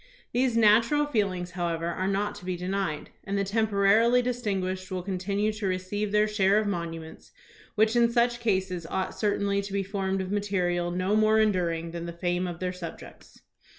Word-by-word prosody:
These 245 -1 +1
natural 230 +7 +4
feelings, 195 -9 -1
however, 170 -2 -2
are 175 +2 -2
not 205 +1 0
to - - -12
be 180 -1 -2
denied, 180 -3 -3
and 200 +1 -2
the 200 - +1
temporarily 220 +3 +3
distinguished 195 -7 -2
will 185 -1 -3
con 190 -1 -3
tinue 205 +3 -1
to 205 - -1
receive 190 +3 -2
their 210 0 +3
share 205 -1 +3
of 215 - +2
monuments, 165 -4 -5 0.4
which 220 +2 +3
in 235 -1 +4
such 240 0 +2
cases 190 -6 -1
ought 190 0 -2
certainly 200 -1 0
to 200 0 -7
be 200 0 0
formed 195 -1 -2
of 190 0 -4
material 180 -4 0
no 185 +3 0
more 215 0 +4
enduring 170 -6 +1
than 170 0 -5
the 170 - -5
fame 175 +1 -1
of 175 -2 -6
their 185 0 -2
subjects. 175 -3 -10
195 Hz, 185 wpm, -27 LUFS, 180-215 Hz, 0.4 s, natural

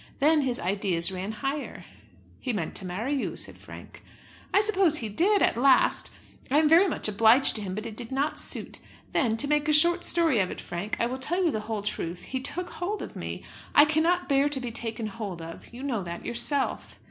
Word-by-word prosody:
Then 305 +2 +3
his 255 -3 -1
ideas 185 -2 0
ran 190 +3 -4
higher." 270 +3 -5 0.5
"He 250 - -3
meant 175 -7 -3
to 190 - -6
marry 210 +10 -3
you," 275 - -2
said - - -2
Frank. - - -12 0.5
"I - - +4
suppose 390 -7 +3
he 225 -5 -2
did, 385 - +3
at - - +2
last. 260 +1 +3 0.4
I 280 - +2
am 310 0 +4
very 335 +6 +6
much - - -1
obliged 225 +5 +4
to - - -2
him, 190 -2 -5
but 215 +2 -5
it 225 -2 -7
did 235 +1 -5
not 280 +3 -1
suit. - - -2 0.3
Then, 225 -3 +1
to 285 - +3
make 295 +1 +1
a - - +4
short 345 +3 +4
story 325 -9 +3
of 185 -2 +1
it, - - -7
Frank, 175 +5 -5
I - - +2
will 255 +2 -4
tell 350 +7 0
you 330 - +2
the 215 - -2
whole 215 -2 -3
truth. 175 -4 -4
He 260 - -4
took 350 +7 -3
hold 400 +5 -4
of - - -9
me. - - -6 0.3
I 295 - +8
cannot 325 +4 +1
bear 280 0 +3
to 285 -2 -1
be 245 -2 -5
taken 225 0 -4
hold 205 -4 -6
of; 165 0 -10
you 245 +3 -9
know 250 -7 -2
that 170 -1 -7
yourself." 270 +4 -2
255 Hz, 220 wpm, -27 LUFS, 210-300 Hz, 0.5 s, I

